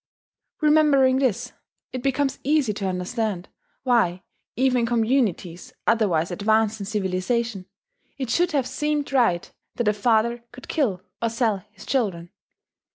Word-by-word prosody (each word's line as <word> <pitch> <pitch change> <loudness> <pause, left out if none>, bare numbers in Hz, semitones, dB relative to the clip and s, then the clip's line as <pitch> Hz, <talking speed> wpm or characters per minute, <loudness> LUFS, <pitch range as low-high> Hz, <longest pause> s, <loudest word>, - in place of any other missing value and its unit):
Remembering 295 -4 +4
this, 250 -1 0 0.4
it 255 - -3
becomes 275 +1 0
easy 285 -6 +2
to 200 -1 -3
understand 185 +1 -2 0.3
why, 215 -8 +2 0.3
even 255 0 +2
in 235 - +1
communities 225 -7 0
otherwise 190 -7 +2
advanced 220 +3 +1
in 200 - -5
civilization, 200 +1 -1 0.5
it 260 -4 -3
should 350 +1 +2
have 280 -5 +1
seemed 295 +1 -2
right 230 -10 +2 0.2
that 240 - -1
a 210 - +4
father 235 +2 +1
could 250 +2 -12
kill 210 - 0 0.2
or 230 - +1
sell 230 -3 +1
his 215 0 -14
children. 190 -10 -1
230 Hz, 135 wpm, -24 LUFS, 200-260 Hz, 0.5 s, Remembering